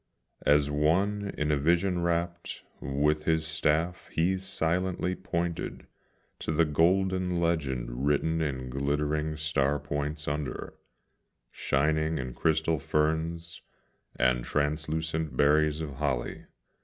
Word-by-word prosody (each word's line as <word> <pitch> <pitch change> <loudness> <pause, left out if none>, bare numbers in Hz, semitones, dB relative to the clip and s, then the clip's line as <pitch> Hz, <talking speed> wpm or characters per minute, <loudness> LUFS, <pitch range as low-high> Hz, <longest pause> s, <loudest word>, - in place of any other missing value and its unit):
As 75 0 +4
one 95 +7 +1
in 75 0 0
a 75 - +3
vision 85 +5 +2
wrapped, 85 0 -2 0.2
with 75 +3 0
his 80 -1 +2
staff 80 +2 0
he 85 +4 +2
silently 90 0 -1
pointed 85 -2 -3 0.5
To - - -3
the 80 +1 +3
golden 90 +3 +2
legend 65 -7 -1
written 80 +3 +1
in 65 -4 -3
glittering 75 +3 -1
star 75 -2 +1
points 75 +2 -4
under, 75 -3 -3 0.8
Shining 80 +3 +1
in 65 -3 -4
crystal 80 +2 +1
ferns, 80 +3 -1 0.5
and 60 -1 +2
translucent 75 +1 -1
berries 75 +1 +3
of 75 -4 -5
holly. 70 -5 -2
75 Hz, 110 wpm, -29 LUFS, 75-85 Hz, 0.8 s, As